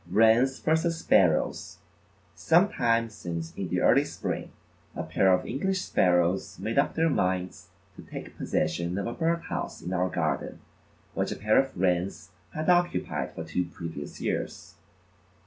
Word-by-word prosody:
Wrens 115 +7 +4
versus 160 +1 +1
Sparrows: 90 - +2 0.6
Some 175 +5 +3
time 115 - +1
since 85 -5 -6
in 95 - -3
the - - 0
early - - +5
spring, - - -4 0.5
a - - -3
pair 95 -1 +2
of 90 0 +2
English 190 +9 -1
Sparrows 90 0 +1
made 115 +5 0
up 140 - +1
their 165 +1 +3
minds 90 - -1 0.3
to - - -9
take - - -9
possession 85 +3 -1
of 100 - -2
a 115 - -3
bird 170 +2 0
house - - -4
in 90 - -5
our 90 0 +1
garden 75 -6 -2 0.5
which - - -1
a - - -2
pair 110 +2 +3
of 135 -4 -1
Wrens 90 -2 0 0.2
had 155 0 -3
occupied 175 -1 +1
for 80 - -5
two 80 +3 -2
previous 80 -4 -8
years. - - -4
95 Hz, 155 wpm, -27 LUFS, 85-140 Hz, 0.6 s, early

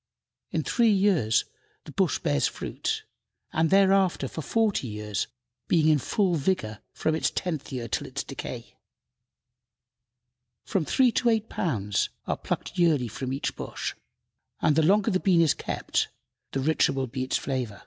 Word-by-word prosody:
In - - -1
three 235 -2 +3
years 190 - +3 0.4
the - - -10
bush - - +1
bears 70 -1 +1
fruit, - - -3 0.5
and 160 0 +2
thereafter 190 -6 +4
for 160 - -6
forty 215 - +1
years, 105 -1 -3 0.4
being 160 -2 +4
in 150 -2 +4
full 190 - +1
vigor 135 - -1
from 160 - -1
its 160 - +1
tenth 160 -7 -3
year 125 -3 -4
till - - -2
its - - -4
decay. - - -7 1.9
From 185 -5 0
three 255 - +4
to 240 - +2
eight 225 -1 +1
pounds 105 - -1 0.2
are - - 0
plucked 190 - -4
yearly 150 -8 +3
from 130 +4 -4
each 140 +2 -2
bush, - - -4 0.7
and 150 - +3
the 160 - +4
longer 200 +7 +3
the 185 - +2
bean 185 -3 +3
is 160 -4 +4
kept - - -1 0.4
the 135 - -1
richer 150 -1 +2
will 135 -1 -1
be 130 +1 -4
its 130 - 0
flavor. 125 -8 -3
155 Hz, 160 wpm, -27 LUFS, 130-190 Hz, 1.9 s, thereafter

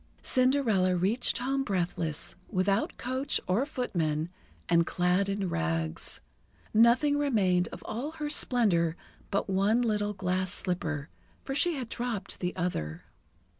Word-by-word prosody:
Cinderella 250 -8 +3
reached 195 +8 +2
home 270 +2 0
breathless, 175 - -2 0.2
without 195 +1 +1
coach 260 +3 -1
or 215 +10 +1
footmen, 165 - -1 0.4
and 170 0 +3
clad 180 +2 +1
in 200 -1 -1
rags. 80 - -2 0.5
Nothing 245 +6 +5
remained 190 -11 +2
of - - -9
all 265 +8 -4
her 305 -2 -4
splendour 190 - +2 0.3
but 200 - 0
one 200 +5 +2
little 210 -2 0
glass 185 -1 -1
slipper, 160 -5 -2 0.3
for 270 - -4
she 340 +4 +2
had 255 -4 -4
dropped 230 -5 -4
the 180 0 -2
other. 120 - -3
195 Hz, 130 wpm, -29 LUFS, 180-245 Hz, 0.5 s, Nothing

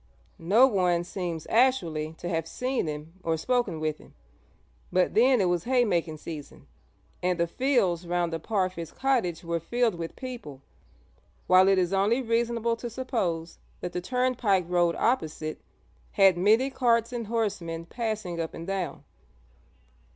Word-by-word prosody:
No 205 +10 +5
one 180 -8 +2
seems 175 -3 -4
actually 170 -11 +2
to 170 - -7
have 165 -2 -1
seen 250 -4 -2
him 150 +2 -6
or 165 -2 0
spoken 245 -3 0
with 155 -1 -2
him, - - -18 0.8
but 185 -1 +2
then 250 +3 +5
it 195 - +3
was 175 -1 0
haymaking 200 -11 +1
season, 150 -2 -9 0.6
and 180 -1 0
the 170 - +3
fields 190 -5 +1
round 175 -1 0
the 165 - -2
Parfitts' 185 -3 -2
cottage 240 -12 0
were 170 0 -1
filled 235 +6 0
with 165 -1 -6
people, 235 - -8 0.8
while 185 +1 +6
it 195 0 +4
is 180 0 +1
only 205 +6 +2
reasonable 230 0 0
to 240 +1 -5
suppose 195 -10 -3 0.2
that 180 - -5
the 180 - -2
turnpike 245 -5 +1
road 175 -1 +2
opposite 155 -10 -1 0.5
had 195 -3 +6
many 220 +9 +3
carts 235 -2 +2
and 235 -3 -4
horsemen 185 -8 -2
passing 215 -5 -3
up 160 - -5
and 165 - -7
down. 190 -2 -3
185 Hz, 150 wpm, -27 LUFS, 170-235 Hz, 0.8 s, while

